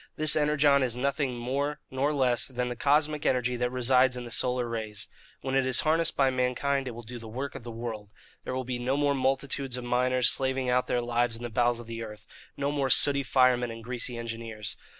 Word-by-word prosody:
This 155 0 +3
Energon 150 -2 +3
is 125 -2 0
nothing 140 -1 -1
more 140 +5 -2
nor 135 +3 0
less 130 -4 +1
than 125 -1 -3
the 120 - -4
cosmic 150 +4 +1
energy 125 -1 +1
that 125 0 0
resides 125 0 +3
in 125 - -5
the 120 - -9
solar 125 +1 +1
rays. 110 -3 -4 0.3
When 130 0 -4
it 135 0 +3
is 130 -1 +2
harnessed 165 +1 +1
by 135 -2 +3
mankind 130 +2 0
it 120 - -6
will 120 - -9
do 120 +2 -8
the 115 - -10
work 130 +5 -5
of - - -8
the 120 - -9
world. 115 -3 -6 0.3
There 130 - -4
will 130 - -2
be 125 -1 -4
no 130 +3 -1
more 145 -1 +2
multitudes 135 -1 -1
of 125 - -6
miners 125 +1 +2
slaving 130 -1 0
out 125 0 +1
their 120 - 0
lives 120 0 0
in 115 - -8
the 120 - -5
bowels 120 0 +1
of 120 - -9
the 115 0 -6
earth, 105 -1 -10 0.3
no 140 0 -1
more 140 -2 -1
sooty 140 +1 +6
firemen 125 -2 +2
and 115 0 -8
greasy 125 0 -3
engineers. 115 -2 -5
125 Hz, 225 wpm, -28 LUFS, 120-135 Hz, 0.3 s, sooty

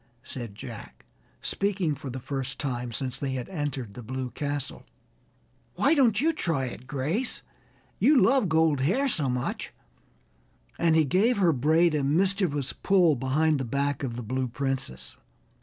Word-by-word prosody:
said 120 -6 -6
Jack, - - -10 0.4
speaking 195 -6 0
for 140 -1 -7
the 130 +1 -5
first 135 +1 -4
time 125 -4 -3
since 130 +2 -4
they 135 -2 -2
had 125 -2 -4
entered 145 - -4
the 125 - -8
Blue 130 +2 -4
Castle. 145 -2 -3 0.9
"Why - - +3
don't 240 -9 +4
you 320 +4 +2
try 165 - 0
it, 125 0 -8
Grace? 155 - -2 0.6
You 290 -2 +5
love 250 -5 +4
gold 160 -3 +3
hair 195 - +2
so 150 - +1
much," 125 0 -3 1.1
and 165 -1 +3
he 160 -1 +4
gave 205 - +3
her 175 -5 +4
braid 160 +5 +3
a 150 -2 +1
mischievous 160 -2 +1
pull 180 -6 +3
behind 145 +4 +1
the - - -1
back 140 +3 -1
of 125 -4 -3
the 120 - -5
Blue 130 +3 -1
Princess. 130 - -4
145 Hz, 155 wpm, -27 LUFS, 130-175 Hz, 1.1 s, You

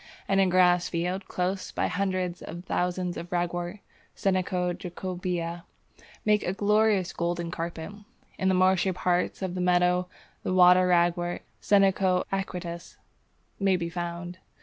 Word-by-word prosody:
In 195 0 +2
a 195 - +4
grass 180 -1 +4
field 180 +3 -2
close 185 +1 -2
by - - -1
hundreds 185 -2 -1
of 170 +2 -8
thousands 180 0 -1
of 170 +1 -7
Ragwort 175 +2 -2 0.3
(Senecio 185 -2 0
jacobæa) 175 -1 -4 0.6
make 210 -1 +4
a 180 - -2
glorious 210 -2 +2
golden 170 0 -2
carpet; 165 0 -5 0.5
in 190 - +1
the 190 - +3
marshy 185 0 +3
part 180 +1 0
of 185 -2 -2
the 180 - -3
meadow 180 0 +2 0.3
the 185 - -1
Water 180 0 +6
Ragwort 175 0 +1 0.2
(Senecio 195 -2 +3
aquaticus) 180 -3 -5 0.6
may 195 -2 +3
be 170 -1 -2
found. 175 +1 -5
180 Hz, 135 wpm, -27 LUFS, 175-190 Hz, 0.6 s, Water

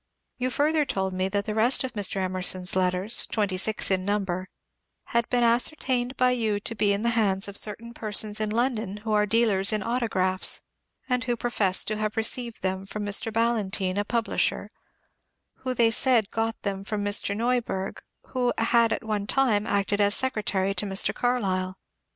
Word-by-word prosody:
You 255 +1 0
further 300 +4 +2
told 190 -8 -2
me 185 +1 -1
that 200 +1 -1
the 215 - -3
rest 230 +6 +3
of 260 - -4
Mr. 205 -2 0
Emerson's 185 -1 0
letters, 185 +3 +1
twenty 205 -4 -1
six 205 +2 +1
in 185 -1 +1
number, 190 -2 -2 0.5
had 235 0 -1
been 245 -1 +2
ascertained 245 +1 +1
by 255 0 +4
you 220 -4 0
to 230 - -2
be 205 -2 +1
in 200 +2 0
the 235 - +2
hands 205 -3 +1
of 200 - -8
certain 225 +3 -2
persons 215 -1 -1
in 215 - 0
London 220 -3 -1
who 220 - -2
are 210 0 +3
dealers 210 -3 +3
in 215 -2 -1
autographs, 190 -6 +1 0.4
and 250 -1 0
who 240 -1 0
professed 215 -6 +1
to 215 - -2
have 215 0 -3
received 230 0 -2
them 190 +1 -2
from 210 +1 -5
Mr. 205 +2 0
BaJlantyne, 210 -4 0
a - - +1
publisher, 230 +1 -1 0.9
who 255 -1 -3
they 230 -1 +4
said 245 -1 +4
had 200 - -25
got 225 0 -2
them 195 -1 -3
from 205 0 -3
Mr. 205 0 +1
Neuberg, 230 -5 -1 0.3
who 250 -2 0
had 230 0 +3
at - - -2
one 210 -2 -2
time 225 -6 +2
acted 200 0 0
as 205 0 +4
a - - +1
secretary 210 -6 -1
to 200 +2 -2
Mr. 195 +1 +1
Carlyle. 190 -7 -1
215 Hz, 185 wpm, -26 LUFS, 195-235 Hz, 0.9 s, by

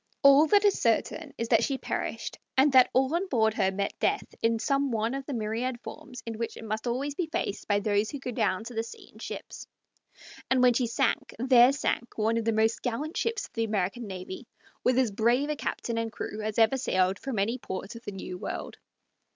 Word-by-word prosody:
All 280 +3 +8
that 410 +4 +4
is 405 - +3
certain 275 +6 0
is 230 0 -3
that 230 - +4
she 275 - 0
perished, - - -4 0.2
and 275 +2 +5
that 255 -1 +7
all 265 +3 +2
on 355 +3 0
board 220 - +2
her 195 -3 +2
met 200 +1 -2
death - - 0
in 230 0 +2
some 275 +4 +1
one 225 0 0
of 275 0 -5
the 290 - -3
myriad 230 +3 -2
forms 260 -6 -9
in 225 -1 -5
which 230 - -3
it - - -9
must 220 +2 -3
always 270 +4 -1
be 335 +3 -2
faced 220 -9 -3
by 205 -1 +3
those 205 0 +1
who 285 - -5
go 260 -2 -5
down 215 -4 0
to 235 +2 -8
the 225 - 0
sea 230 - -11
in - - -16
ships; - - -7 0.8
and 260 -1 +3
when 250 -1 +6
she 245 0 +1
sank 235 +2 0
there 250 +1 +6
sank 245 -3 -2
one 225 +1 +1
of 230 - -1
the 225 - +3
most 220 +1 +1
gallant 280 +7 -3
ships 460 0 -1
of - - -17
the 230 - 0
American 210 +1 -1
navy, 190 +4 -7 0.4
with 250 0 +3
as 255 -5 +3
brave 240 +7 +2
a - - -1
captain 235 -4 -3
and 225 0 -2
crew 215 0 -5
as 215 0 -3
ever 225 +3 +4
sailed 185 -6 +1
from 265 -4 -4
any 225 +6 0
port 190 +1 -6
of 230 - -10
the 205 - -6
New 185 -2 -7
World. - - -5
230 Hz, 225 wpm, -28 LUFS, 220-265 Hz, 0.8 s, All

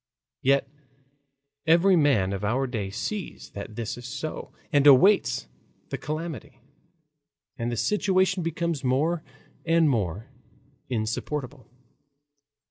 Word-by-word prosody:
Yet 135 +1 +3 1.0
every 175 +4 +5
man 130 - +3
of 100 +1 -4
our 125 +6 +1
day 110 -6 -3
sees 195 - -5
that 100 +1 -8
this 115 +1 -4
is 120 - -8
so 155 - -5 0.2
and 145 0 +5
awaits 135 - +5 0.4
the - - -3
calamity. 155 -4 -5 1.0
And 115 +1 -3
the 120 - -3
situation 190 - +2
becomes 165 -2 -2
more 150 +6 +1 0.4
and 165 -1 +3
more 105 - -1 0.6
insupportable. 125 +3 -3
135 Hz, 110 wpm, -26 LUFS, 115-165 Hz, 1.0 s, every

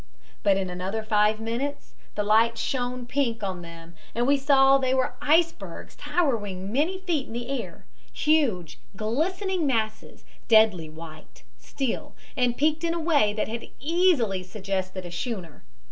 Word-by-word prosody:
But 200 -2 +3
in 190 -2 -2
another 190 +5 -3
five 215 0 +2
minutes 235 +6 -4 0.2
the 210 - 0
light 225 +2 +3
shone 245 +1 -2
pink 240 -4 -1
on 185 -3 -3
them 170 0 -11 0.2
and 240 +1 +1
we 280 +2 +4
saw 270 -1 +5
they 260 0 +1
were 260 -1 0
icebergs 330 +2 0
towering 205 - -1
many 320 +8 +1
feet 345 -7 -2
in - - -9
the 240 +2 -5
air, - - -12 0.3
huge, 235 - +1 0.2
glistening 335 - -1
masses, 220 -4 -2 0.2
deadly 215 -8 +4
white, 155 0 -12 0.2
still, 270 -4 -4 0.2
and 245 -2 +1
peaked 310 +2 +1
in 335 0 0
a - - -2
way 305 -10 +3
that 215 - -1
had 230 +1 -6
easily 290 - +2
suggested 185 -1 -4
a 175 - -7
schooner. 175 - -5
230 Hz, 150 wpm, -26 LUFS, 195-285 Hz, 0.3 s, saw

